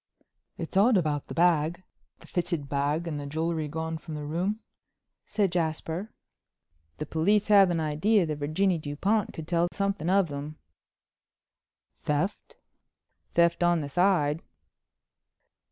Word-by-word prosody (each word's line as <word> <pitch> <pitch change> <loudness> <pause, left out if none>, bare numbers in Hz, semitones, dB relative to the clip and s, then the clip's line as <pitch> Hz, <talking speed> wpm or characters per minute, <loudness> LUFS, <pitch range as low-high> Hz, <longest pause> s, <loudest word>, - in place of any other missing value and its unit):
"It's - - -6
odd 210 +3 +5
about 150 -5 -1
the - - -7
bag—the 170 +1 -1
fitted 170 -5 -2
bag 145 +4 -1
and 150 -3 -3
the 145 - -6
jewelry 160 +1 -2
gone 160 +2 -4
from 155 0 -8
the 150 - -5
room," 180 +8 -1 0.7
said 205 -4 +1
Jasper. 170 +4 -2 0.9
"The 150 - -4
police 200 +8 +1
have 200 -3 +7
an 170 -1 0
idea 165 +6 +2
that 155 -2 -3
Virginie 165 +5 +1
Dupont 185 +9 0
could 160 -1 -8
tell 170 0 +2
something 200 -4 -1
of 190 -3 +3
them." 145 +2 -6 1.4
"Theft?" 150 +8 -2 0.8
"Theft 170 0 +3
on 175 -1 +3
the 145 - -5
side." 165 -2 +2
165 Hz, 130 wpm, -27 LUFS, 150-190 Hz, 1.4 s, have